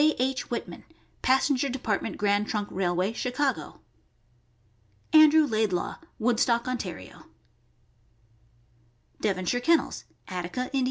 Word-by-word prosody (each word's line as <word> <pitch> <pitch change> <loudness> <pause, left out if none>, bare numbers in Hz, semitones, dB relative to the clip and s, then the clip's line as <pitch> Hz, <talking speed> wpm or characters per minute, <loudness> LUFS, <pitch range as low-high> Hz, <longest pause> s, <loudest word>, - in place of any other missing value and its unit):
H. 260 +1 -1
Whitman, - - -5 0.4
Passenger 265 +1 +2
Department 260 0 -2
Grand 205 0 +1
Trunk 205 -2 -2
Railway, 185 +2 0
Chicago; 250 - -2 1.3
Andrew 310 0 +7
Laidlaw, 215 -8 -1 0.2
Woodstock, 235 +1 +1
Ontario; 185 - -6 1.9
Devonshire 195 +4 0
Kennels, 330 +5 +1 0.2
Attica, 185 +7 -4
Ind. 270 - +2
235 Hz, 90 wpm, -27 LUFS, 195-260 Hz, 1.9 s, Andrew